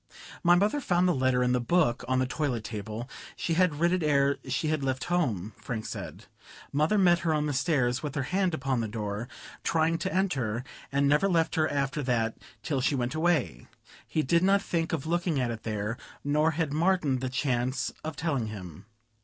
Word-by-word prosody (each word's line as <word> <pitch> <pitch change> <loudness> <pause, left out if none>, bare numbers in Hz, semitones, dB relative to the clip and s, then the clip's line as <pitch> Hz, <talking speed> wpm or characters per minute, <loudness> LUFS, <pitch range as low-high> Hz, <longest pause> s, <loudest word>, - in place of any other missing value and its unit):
"My 175 0 +6
mother 210 +10 +2
found 180 -6 +2
the 180 - +3
letter 130 -2 +2
in 125 - +2
the 125 0 +2
book, 125 -3 +2
on 130 +1 +1
the 130 - +2
toilet 130 -4 -2
table. 110 +2 -5 0.3
She 165 - -1
had 175 -2 +3
writ 170 +1 +3
it 185 - +1
ere 140 -2 +2
she 140 +4 0
had 155 -3 0
left 130 -1 -1
home," 110 - 0
Frank 110 -3 -5
said. - - -7 0.5
"Mother 155 +8 +2
met 175 -3 +5
her 160 -2 +1
on 150 0 0
the 150 - -1
stairs, 130 -4 +1
with 150 -1 -5
her 145 - 0
hand 185 +3 0
upon 130 -4 -1
the 110 - -2
door, 105 +1 -4 0.4
trying 165 0 +1
to 190 - -2
enter, 130 - 0 0.3
and 140 +1 +2
never 150 +7 +4
left 165 -2 +2
her 155 -1 +2
after 140 +1 -1
that 115 -4 0 0.3
till 140 -4 -1
she 140 +2 +1
went 125 0 -1
away. 155 - 0 0.4
He 155 - 0
did 170 +5 +3
not 195 +2 +3
think 165 -1 -1
of 160 -4 -2
looking 170 -2 0
at 125 -2 0
it 110 -1 -6
there, 105 +1 -3 0.2
nor 150 +2 +2
had 160 -4 0
Martin 160 -5 +2
the 130 0 -2
chance 130 -1 -1
of 155 0 -4
telling 140 -8 -1
him. 95 -3 -9
140 Hz, 205 wpm, -28 LUFS, 125-165 Hz, 0.5 s, My